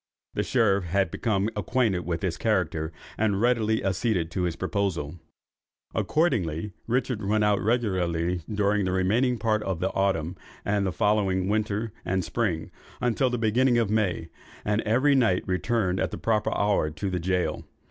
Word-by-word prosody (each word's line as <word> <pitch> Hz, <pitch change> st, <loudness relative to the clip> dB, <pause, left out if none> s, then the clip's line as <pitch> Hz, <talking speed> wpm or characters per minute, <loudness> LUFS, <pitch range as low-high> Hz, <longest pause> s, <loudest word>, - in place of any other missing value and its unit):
The -, -, 0 dB
sheriff 100 Hz, -6 st, +2 dB
had 95 Hz, +3 st, +1 dB
become 105 Hz, -3 st, 0 dB
acquainted 105 Hz, -4 st, 0 dB
with 85 Hz, -1 st, -2 dB
his -, -, 0 dB
character, 80 Hz, 0 st, 0 dB, 0.3 s
and 105 Hz, -3 st, +2 dB
readily 110 Hz, -2 st, +2 dB
acceded 95 Hz, -3 st, 0 dB
to 90 Hz, -, -2 dB
his 85 Hz, -2 st, -1 dB
proposal. 90 Hz, -4 st, -2 dB, 0.7 s
Accordingly 105 Hz, -, 0 dB
Richard 120 Hz, -2 st, 0 dB
went 105 Hz, +2 st, +2 dB
out 105 Hz, -1 st, +2 dB
regularly 90 Hz, -6 st, 0 dB
during 105 Hz, -1 st, +1 dB
the 95 Hz, -, 0 dB
remaining 115 Hz, +7 st, +2 dB
part 110 Hz, -2 st, +1 dB
of 95 Hz, -5 st, -2 dB
the 95 Hz, +2 st, 0 dB
autumn, 95 Hz, -3 st, 0 dB, 0.3 s
and 100 Hz, -1 st, +1 dB
the -, -, 0 dB
following 95 Hz, 0 st, +1 dB
winter 105 Hz, +1 st, -1 dB
and 95 Hz, 0 st, 0 dB
spring, 90 Hz, -8 st, -1 dB, 0.3 s
until 125 Hz, +2 st, +1 dB
the 125 Hz, -, -1 dB
beginning 120 Hz, +3 st, +3 dB
of 115 Hz, -3 st, +1 dB
May, 95 Hz, -6 st, 0 dB, 0.4 s
and 105 Hz, +1 st, +1 dB
every 130 Hz, +6 st, +4 dB
night 115 Hz, -9 st, +3 dB
returned 95 Hz, 0 st, 0 dB
at -, -, 0 dB
the -, -, -6 dB
proper 110 Hz, -2 st, +1 dB
hour 100 Hz, -6 st, +2 dB
to 95 Hz, +5 st, -4 dB
the 90 Hz, -, -1 dB
gaol. 90 Hz, +1 st, -1 dB
100 Hz, 160 wpm, -26 LUFS, 90-110 Hz, 0.7 s, every